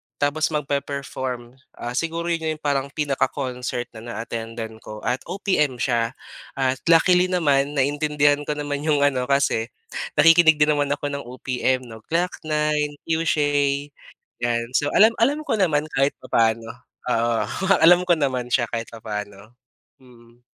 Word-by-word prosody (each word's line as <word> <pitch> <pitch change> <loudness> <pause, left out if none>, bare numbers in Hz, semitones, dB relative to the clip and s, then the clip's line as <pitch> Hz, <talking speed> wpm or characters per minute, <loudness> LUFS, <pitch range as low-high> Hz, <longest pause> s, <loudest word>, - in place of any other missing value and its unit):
tapos 145 +2 +1
magpe-perform. 135 -4 -4 0.2
Ah, 120 - -5
siguro 165 +5 -2
'yon 160 -1 -1
'yong 155 - -20
parang 140 -2 0
pinaka-concert 130 -4 -2
na 110 - -11
na-attendan 115 -1 -6
ko 105 -1 -10
at 125 +1 0
OPM 175 -7 0
siya 120 -1 -1 0.4
at 130 -1 0
luckily 180 +2 +5
naman 145 -5 +1
naintindihan 145 +1 +2
ko 150 - -1
naman 145 -1 -3
'yong 145 -1 +1
ano 130 -3 +1
kasi 140 -5 +1 0.5
nakikinig 165 +1 +6
din 150 0 +3
naman 145 -1 +1
ako 145 0 -4
ng 140 0 -4
OPM 130 0 -1
'no, 115 -2 -11
Glock 175 +2 -1
9, 150 -1 0
Cueshe, 145 -3 0 0.5
yan. 115 -1 0
So, 145 +1 +2
alam 220 +2 +6
alam 285 +5 +2
ko - - 0
naman 155 -5 +2
kahit 135 +1 +2
papaano. 115 0 +1 0.4
Oo, 115 -1 +1 0.5
alam 175 +2 +7
ko - - +3
naman 130 -4 -1
siya 120 -1 +2
kahit 115 -1 -4
papaano, 105 0 -7 0.5
mm. 120 -1 -20
140 Hz, 145 wpm, -23 LUFS, 120-150 Hz, 0.5 s, alam